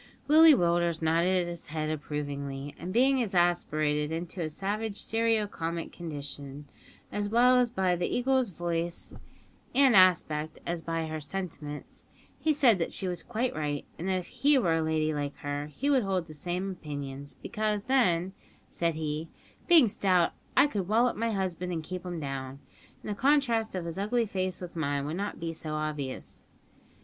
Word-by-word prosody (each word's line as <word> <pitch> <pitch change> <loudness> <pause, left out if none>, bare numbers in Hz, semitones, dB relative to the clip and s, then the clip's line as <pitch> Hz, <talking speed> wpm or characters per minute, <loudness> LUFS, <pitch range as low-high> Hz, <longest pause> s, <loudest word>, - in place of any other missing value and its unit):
Willie 310 +1 +8
Willders 170 -3 +1
nodded 175 +3 +2
his 170 -1 -5
head 155 0 -2
approvingly, 145 -2 -4
and, 180 +2 -5
being 260 +5 +4
exasperated 160 -7 +1
into 170 +2 -4
a 160 - -1
savage 200 +5 -3
serio 225 -1 +1
comic 170 -4 -4
condition, 145 -3 -6 0.5
as 205 0 -2
well 250 +3 +5
by 185 -2 +2
the 175 0 -1
Eagle's 260 -1 +1
voice 170 -1 -3 0.6
and 265 -3 +6
aspect 160 -4 +4
as 170 -1 -2
by 165 0 -2
her 155 0 -4
sentiments, 155 -3 -6 0.3
he 315 - +2
said 260 -9 +4
that 165 - -1
she 190 - -2
was 180 -1 -3
quite 240 +2 -2
right, 145 -2 -2
and 180 +4 -2
that 190 - +2
if 180 - -4
he 285 0 +3
were 170 -10 +2
a - - 0
lady 155 -1 0
like 145 -1 -3
her 145 0 -4
he 150 - -4
would 275 -3 +4
hold 190 -4 -1
the 155 - -11
same 180 +5 -3
opinions, 145 -5 -7
because 210 -2 -1
then, 190 -9 +2 0.3
said 170 -2 -1
he, 155 +1 -3 0.4
"being 330 -8 +7
stout, 185 -4 +2 0.3
I - - +8
could 205 -11 -2
wallop 230 +4 +3
my 230 +2 -1
husband 180 -4 -2
an' 165 -2 -3
keep 180 +2 -6
him 175 -2 -4
down, 135 -2 -5 0.5
an' - - -8
the 210 - -1
contrast 235 -3 +2
of 180 -2 -3
his 170 +2 -4
ugly 230 +4 +1
face 185 -3 -3
with 180 -1 -8
mine 145 -3 -1
would 155 +4 -3
not 205 +1 -4
be 165 0 -3
so 155 -1 -5
obvious." 150 -3 -4
175 Hz, 175 wpm, -29 LUFS, 155-210 Hz, 0.6 s, Willie